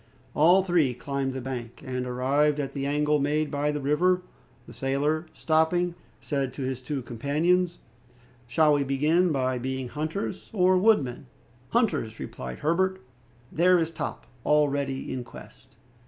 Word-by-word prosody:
All 175 +5 +5
three 165 -9 +2
climbed 135 +1 -3
the 130 - -4
bank; 120 -2 -6
and 125 -1 -3
arrived 140 +4 +1
at 140 -2 -3
the 140 -1 -2
angle 150 +1 +2
made 150 +2 0
by 145 0 0
the 150 - -3
river, 180 +6 +2 0.4
the - - -12
sailor, 145 +5 -1
stopping, 170 +2 +1 0.3
said 135 -3 -2
to 135 - -5
his 130 -1 -3
two 135 0 -4
companions, 165 +9 +1 0.7
"Shall 150 +5 +4
we 145 -1 +2
begin 155 +6 +2
by 130 -3 0
being 130 0 -3
hunters 155 +8 -4
or 185 -2 +4
wood 210 -2 +4
men?" 125 +1 -7 0.4
"Hunters," 200 - 0
replied 65 0 -6
Herbert. 185 +4 +1 0.5
"There 180 +3 +4
is 165 -1 0
Top 165 - -5 0.2
already 140 -2 +1
in 125 - -4
quest." - - -14
145 Hz, 150 wpm, -27 LUFS, 130-165 Hz, 0.7 s, All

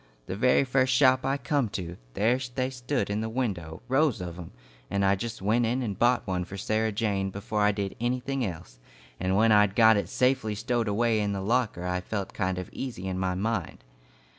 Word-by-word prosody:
The 95 - -4
very 125 +6 +4
first 130 0 +2
shop 130 0 +4
I 135 +1 +1
come 135 -2 0
to, 85 -2 -6 0.2
there 115 +5 +2 0.2
they 130 0 -1
stood 125 -4 -2
in 105 +1 -1
the 110 - -3
window, 95 -10 -3
rows 135 -2 +2
of 90 -2 -6
'em, 85 - -8 0.4
and 100 0 +1
I 95 - +4
just 110 +1 -5
went 115 +4 +2
in 125 +3 0
and 100 -5 -4
bought 125 +1 +3
one 90 -3 -1
for 95 +2 -8
Sarah 110 +3 0
Jane 100 -2 -1
before 105 +2 -3
I 105 0 +4
did 100 -1 -4
anything 130 +2 -1
else, 80 - -6 0.4
and 95 +1 0
when 110 +1 +4
I'd 105 -1 +4
got 110 -2 +6
it 100 -3 -2
safely 125 -3 +1
stowed 115 +2 -1
away 110 +2 +2
in 105 -1 0
the 100 - -3
locker, 110 -4 0
I 90 0 -1
felt 100 +1 -4
kind 95 -2 -1
of 90 - -4
easy 115 -8 -5
in 95 -1 -2
my 95 -1 0
mind. 100 - -3
110 Hz, 215 wpm, -27 LUFS, 95-125 Hz, 0.4 s, got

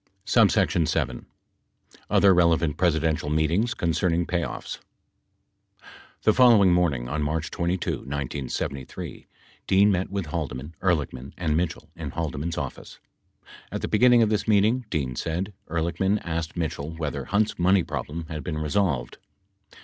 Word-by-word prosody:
[p. - - -6
269] 80 -3 +4
7. 65 -1 -1 0.8
OTHER 100 -2 +5
RELEVANT 85 -3 +3
PRESIDENTIAL 80 -3 +1
MEETINGS 85 +10 +1
CONCERNING 85 -1 0
PAYOFFS 85 -1 -3 1.4
The 110 - +5
following 110 -8 +6
morning, 75 -9 +1
on 75 +4 -2
March 80 +2 -2
22, 85 +1 -1
1973, 70 -1 -5 0.4
Dean 100 +2 +5
met 90 -1 0
with 100 -2 -3
Halde 75 -6 -3
man, 70 +6 -8
Ehrlichman 70 -7 -1
and 80 -4 0
Mitchell 85 0 -2
in - - -5
Haldeman's 80 +1 -3
office. 70 -4 -6 0.7
At - - -4
the - - -2
beginning 120 +1 +5
of 110 - +2
this 105 0 -1
meeting, 110 +3 +3
Dean 70 -8 -2
said, 90 +9 -3 0.2
Ehrlichman 85 +5 0
asked 80 0 -4
Mitchell 80 -3 -3
whether 80 -3 -4
Hunt's 105 0 0
money 95 +1 +4
problem 80 +2 -5
had 75 -3 -6
been 80 -3 -3
resolved. 75 -5 -1
85 Hz, 135 wpm, -25 LUFS, 75-95 Hz, 1.4 s, following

